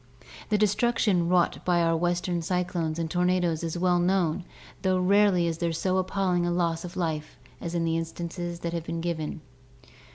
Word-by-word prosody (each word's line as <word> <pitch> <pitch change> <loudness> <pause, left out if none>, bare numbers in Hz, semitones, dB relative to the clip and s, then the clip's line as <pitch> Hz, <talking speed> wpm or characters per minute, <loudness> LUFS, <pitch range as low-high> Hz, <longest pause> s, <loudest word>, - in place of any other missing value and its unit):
The 210 - +3
destruction 210 -4 +2
wrought 180 -1 +2
by 175 -1 +2
our 165 0 +2
western 175 +1 0
cyclones 175 -2 -1
and 165 -1 -1
tor 175 +2 0
nadoes 180 -3 +1
is 165 +1 -3
well 180 0 +2
known 175 -1 +1 0.4
though 185 -1 +2
rarely 190 -1 +4
is 165 -1 -2
there 170 -1 0
so 185 +3 0
appalling 185 -1 +1
a 175 - 0
loss 170 -1 0
of 180 +1 -8
life 160 -4 -3 0.2
as 170 0 -4
in 170 - +1
the 165 0 +1
instances 170 +1 -5
that 170 0 -3
have 170 -2 -2
been 165 0 -3
given. 160 -2 -3
175 Hz, 185 wpm, -27 LUFS, 165-185 Hz, 0.4 s, rarely